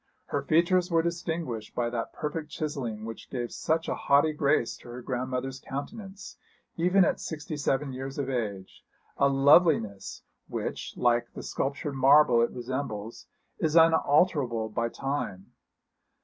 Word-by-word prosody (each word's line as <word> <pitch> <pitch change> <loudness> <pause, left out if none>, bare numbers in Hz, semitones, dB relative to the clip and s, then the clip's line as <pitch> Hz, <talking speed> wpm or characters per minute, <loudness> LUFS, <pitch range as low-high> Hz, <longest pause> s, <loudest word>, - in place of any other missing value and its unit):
Her - - -2
features 175 +3 +2
were 165 -1 +2
distinguished 165 -10 -3
by 120 -1 -1
that 115 -1 -3
perfect 155 0 -4
chiselling 135 -9 -4
which 115 -1 -8
gave 120 -2 -4
such 160 +1 -1
a - - 0
haughty 145 +3 +3
grace 140 -5 +1
to - - -16
her 120 +1 -7
grandmother's 130 +1 -3
countenance, 195 +9 -7 0.4
even 180 +2 +4
at - - 0
sixty 155 0 -5
seven 140 -1 -1
years 135 +1 -6
of 140 -2 -2
age 105 -7 -4 0.3
a 140 - +4
loveliness 135 - +3 0.2
which, - - -5
like 120 -1 +2
the - - -7
sculptured 140 +1 -3
marble 135 -2 +5
it 120 - +2
resembles, 120 -3 -5 0.3
is 160 0 0
unalterable 150 -7 +3
by 115 +2 -1
time. 135 -9 -4
135 Hz, 140 wpm, -28 LUFS, 120-160 Hz, 0.4 s, marble